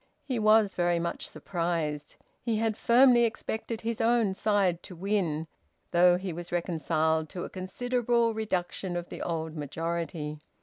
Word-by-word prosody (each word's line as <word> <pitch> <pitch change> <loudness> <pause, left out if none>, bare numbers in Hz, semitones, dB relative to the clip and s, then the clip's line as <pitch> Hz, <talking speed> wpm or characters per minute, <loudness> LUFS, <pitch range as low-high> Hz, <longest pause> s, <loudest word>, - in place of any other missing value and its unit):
He 255 -4 -2
was 215 -2 +5
very 175 -1 +1
much 170 0 -3
surprised. 165 -4 -3 0.3
He 230 -3 0
had 220 -1 0
firmly 240 +1 +5
expected 225 0 -3
his 230 0 -2
own 225 -3 +3
side 195 -4 +1
to 180 - -10
win, 175 -4 -1 0.5
though 175 0 +5
he 185 -1 -4
was 175 +1 -7
reconciled 160 -2 0
to 180 - -5
a - - -7
considerable 235 +4 0
reduction 190 -4 -2
of 175 0 -4
the - - -7
old 160 -2 -3
majority. 160 0 -3
180 Hz, 145 wpm, -29 LUFS, 170-220 Hz, 0.5 s, was